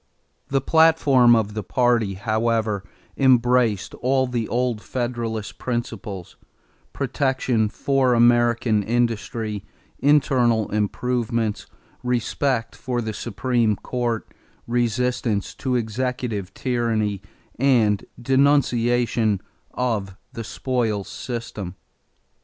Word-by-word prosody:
The 135 0 +1
platform 140 -6 +5
of 105 -2 0
the 110 - -3
party, 115 -1 +1
however, 110 0 0 0.3
embraced 125 -5 +3
all 130 +1 +1
the 120 -3 -2
old 120 -2 -1
Federalist 120 -4 -4
principles: 115 -6 -5 0.5
protection 130 -5 0
for 130 +1 +1
American 120 -2 +3
industry; 115 -2 -1 0.4
internal 130 -6 +3
improvements; 115 +1 -1 0.3
respect 125 0 -1
for 125 -2 -3
the 110 -2 -3
Supreme 115 0 0
Court; 120 0 -3 0.4
resistance 120 -2 0
to 130 -2 -2
executive 115 -3 -2
tyranny; 115 -5 -1 0.4
and 115 -7 +3 0.2
denunciation 120 -5 +2 0.4
of 105 -6 -2 0.2
the 115 - -5
spoils 115 -4 -2
system. 115 -7 -6
120 Hz, 90 wpm, -23 LUFS, 110-125 Hz, 0.5 s, platform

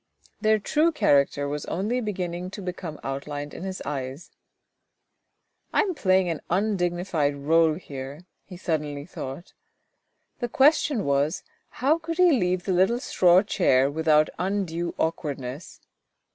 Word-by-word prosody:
Their 215 0 +3
true 305 +10 +2
character 140 - +2
was 145 0 -3
only 215 +8 -1
beginning 180 -4 -3
to - - -6
become 180 -4 -6
outlined 145 +2 -5
in - - -8
his 190 0 -5
eyes. 135 +1 -5 0.7
" - - -48
I - - +5
am 400 -4 -1
playing 185 - +2
an 165 -3 -3
undignified 175 -6 0
role 160 +2 +3
here," 140 0 -8 0.2
he 180 - -11
suddenly 150 -5 -3
thought. 145 -1 -8 0.9
The 240 - -2
question 285 -3 +3
was, 140 +2 +1 0.3
how 295 +6 +1
he - - -34
could 330 0 -4
leave 215 - +3
the 190 - -1
little 190 +7 +3
straw 180 -6 +4
chair 140 -10 +2
without 155 0 +3
undue 180 -3 -2
awkwardness. 145 -2 -4
175 Hz, 135 wpm, -25 LUFS, 145-200 Hz, 0.9 s, I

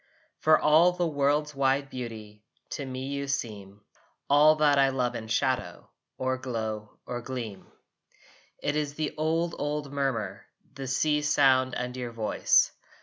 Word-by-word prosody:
For 155 0 +5
all 160 +4 +5
the 175 0 -1
world's 150 0 +1
wide 135 0 +1
beauty 110 -4 -8 0.3
To 140 - -4
me 130 0 -5
you 140 0 -3
seem, 105 -7 -4 0.5
All 150 +2 +7
that 150 -2 +3
I 135 0 +5
love 125 -2 -1
in 110 - -6
shadow 130 +3 -1 0.3
Or 130 0 -1
glow 110 -4 -4
or 120 0 -4
gleam. 115 -6 -6 1.0
It 145 - 0
is 145 -1 -2
the 155 -1 -2
old 165 +2 0
old 145 -1 -3
murmur, 130 -8 -2 0.3
The 135 -1 -6
sea's 150 +3 +1
sound 130 -2 +4
and 125 0 -4
your 125 -2 -5
voice. 110 -2 +2
135 Hz, 145 wpm, -28 LUFS, 120-150 Hz, 1.0 s, All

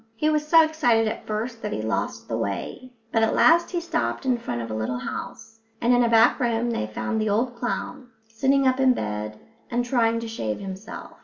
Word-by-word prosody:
He 305 +6 +1
was 300 0 0
so 325 +1 +7
excited 245 -8 +2
at 215 - -5
first 225 +2 -3
that 210 - -4
he - - -3
lost 110 0 -2
the 115 - -2
way, 115 - -4 0.2
but 225 - +2
at 225 - +2
last 335 +2 +5
he 355 - -1
stopped 340 -4 -2
in 250 -2 +1
front 120 - -4
of 115 -1 -5
a - - -3
little 110 +3 -2
house; 225 - -7 0.2
and 240 +1 +3
in 245 0 +4
a 235 - +2
back 230 +3 +5
room 235 -1 0
they 105 - -2
found 110 - -2
the 215 - 0
old 235 +5 +1
clown, 245 +1 -4 0.2
sitting 270 +5 +1
up 260 0 +2
in 260 -1 +4
bed 105 0 -4 0.3
and 240 0 0
trying 230 -2 +2
to 230 - -5
shave 110 - -3
himself. 195 +3 -8
230 Hz, 220 wpm, -24 LUFS, 195-255 Hz, 0.3 s, so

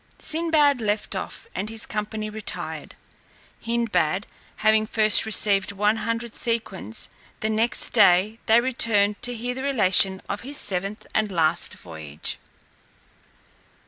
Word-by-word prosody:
Sinbad 310 -5 +1
left 210 -1 -2
off, 190 - -6
and 200 +3 -4
his 225 0 -3
company 215 +1 -4
retired, 215 0 -3 0.7
Hindbad 205 -6 -1 0.3
having 215 0 +2
first 215 0 +5
received 200 -2 +3
one 210 +2 +1
hundred 230 +1 -4
sequins; 215 - -3 0.3
and 215 0 -2
next 225 +1 +2
day 205 +1 +4
they 225 +1 +5
returned 220 -5 +2
to 245 0 +1
hear 245 +2 -4
the 260 - -6
relation 195 -8 +3
of 200 - -4
his 280 +4 -4
seventh 195 +2 -3
and 215 -2 0
last 165 -1 0
voyage. 80 -3 -8
215 Hz, 125 wpm, -23 LUFS, 195-230 Hz, 0.7 s, first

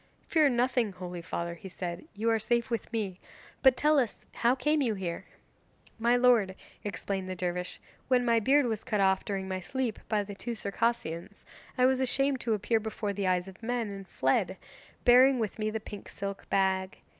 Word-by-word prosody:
'Fear 310 -3 +4
nothing, 245 -3 +1
holy 180 -1 -6
father,' 170 +1 -3
he 180 +3 -10
said, 175 - -5
'you 220 +3 -2
are 225 - +2
safe 235 +3 0
with 230 - -2
me. 200 -5 -2 0.4
But 265 -2 +6
tell 300 0 +4
us, 245 -5 -1 0.2
how 240 +2 +2
came 300 +3 +1
you 230 -5 +1
here?' 175 -3 -4 0.7
'My 235 +2 +4
lord,' 240 -6 +4 0.3
explained 195 -2 -3
the 185 - -3
dervish, 180 0 -3 0.3
'when 250 -1 +3
my 230 -1 +4
beard 275 +5 +4
was 220 -3 -2
cut 215 -5 -1
off 190 -1 +3
during 195 -2 -3
my 185 0 -2
sleep 240 +4 -3
by 210 -2 +2
the 200 0 -8
two 235 +4 -4
Circassians, 205 -5 -2 0.3
I 250 - +5
was 260 0 +3
ashamed 270 +1 +1
to 230 -2 0
appear 215 +3 +1
before 215 -1 -3
the 200 -1 -1
eyes 180 0 +1
of 190 +2 -12
men, 230 -2 -2
and 195 -1 -8
fled, - - +1 0.5
bearing 255 +2 +7
with 220 -2 -3
me 215 0 0
the 220 +1 -3
pink 205 -1 -9
silk 200 0 -6
bag. 190 -1 +1
215 Hz, 190 wpm, -30 LUFS, 190-245 Hz, 0.7 s, bearing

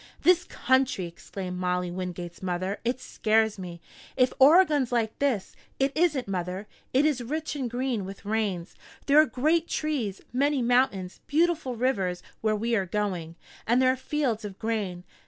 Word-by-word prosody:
"This 360 0 +5
country!" 260 - +1
exclaimed 180 +2 -7
Molly 180 -1 -1
Wingate's 175 -1 -6
mother. 185 +2 -2
"It 245 +2 -1
scares 220 -3 +1
me! 175 -2 -7 0.4
If 255 -1 +3
Oregon's 290 -3 +6
like 225 -3 0
this 255 -9 0
" - - -37
"It 270 0 +2
isn't, 310 -7 +2
mother. 185 +1 -3 0.3
It 270 +3 +3
is 290 -5 +1
rich 305 +6 -3
and 260 -4 -2
green, 245 -3 -1
with 195 +2 -9
rains. 205 -5 -1 0.3
There 295 +2 +7
are 310 - +2
great 320 +6 +1
trees, 260 -11 -2
many 275 0 +2
mountains, 235 -7 +1
beautiful 315 -4 +1
rivers 195 -8 0 0.2
where 215 -1 +2
we 230 +2 0
are 195 -3 0
going, 180 -5 -2 0.3
and 240 +3 +4
there 255 0 +5
are - - 0
fields 260 -4 -1
of 200 -2 -7
grain. 205 -6 -2
230 Hz, 165 wpm, -27 LUFS, 190-270 Hz, 0.4 s, There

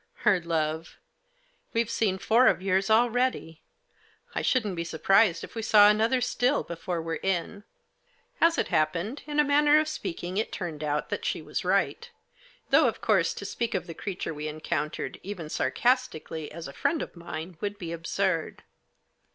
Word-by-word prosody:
Her 200 -3 +5
love! 160 -1 -2 0.4
" - - -40
We've 230 0 +2
seen 200 -5 +1
four 230 +6 +4
of - - +4
yours 190 +1 +1
already; 235 -7 +1 0.7
I - - -1
shouldn't 215 -8 +1
be 170 - -2
surprised 175 +3 +3
if - - -9
we 225 - -4
saw 210 -1 +7
another 225 +4 +2
still 250 +3 +1
before 170 +1 -4
we're 165 0 -3
in." 195 +2 -2 0.8
As 335 0 +5
it - - 0
happened, 170 - 0
in 300 0 -1
a - - +7
manner 295 +1 +5
of 310 - 0
speaking, 180 - -4
it 220 - -1
turned 160 -5 -5
out 150 0 -1
that - - -3
she - - -1
was - - -4
right; 475 - 0 0.6
though, - - +6
of - - -2
course, - - +2
to - - -7
speak 230 -2 -2
of 185 - -2
the 170 - -7
creature 185 -2 -4
we 150 0 -5
encountered, 155 0 -3
even 180 -5 -6
sarcastically, 205 - -1
as 165 0 -7
a 140 - -9
friend 325 - 0
of - - -10
mine, 170 0 -7
would 205 -1 -3
be 170 -4 -6
absurd. 170 +1 -2
190 Hz, 175 wpm, -27 LUFS, 165-235 Hz, 0.8 s, saw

